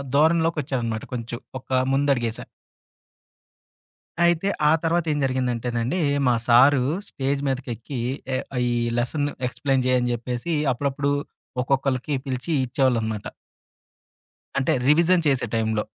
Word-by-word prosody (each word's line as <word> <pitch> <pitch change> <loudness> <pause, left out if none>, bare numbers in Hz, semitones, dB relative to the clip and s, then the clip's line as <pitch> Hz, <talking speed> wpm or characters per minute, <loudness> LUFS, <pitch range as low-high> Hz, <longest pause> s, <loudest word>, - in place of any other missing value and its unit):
ధోరణిలోకొచ్చానమాట 145 -7 +1
కొంచెం. 120 -1 -4 0.2
ఒక - - -24 0.3
ముందు 140 +1 +2
అడుగేసా. 115 -2 -3 1.8
అయితే 170 +2 +2 0.2
ఆ - - +5
తర్వాతేం 165 -2 +1
జరిగిందంటేనండి, 125 +2 -1 0.3
మా 125 - +4
సారు 130 +3 +6 0.3
స్టేజ్ 140 +1 -2
మీదకెక్కి 125 -1 -4 0.4
ఎ - - +2 0.3
ఈ - - 0 0.3
లెసన్‌ని 145 +4 -1 0.2
ఎక్స్‌ప్లెయిన్ 135 0 0
చేయ్యని 125 -1 +2
చెప్పేసి, 125 +7 -3 0.2
అప్పుడప్పుడు 140 +2 -1 0.5
ఒక్కొక్కళ్ళకి 135 +1 0
పిలిచి 130 +3 -3
ఇచ్చేవాళ్ళనమాట. 115 -5 0 1.3
అంటే, 135 - +1 0.2
రివిజన్ 170 +4 +4
చేసే 135 -3 +2
టైంలో. 110 -1 0
130 Hz, 100 wpm, -24 LUFS, 120-145 Hz, 1.8 s, సారు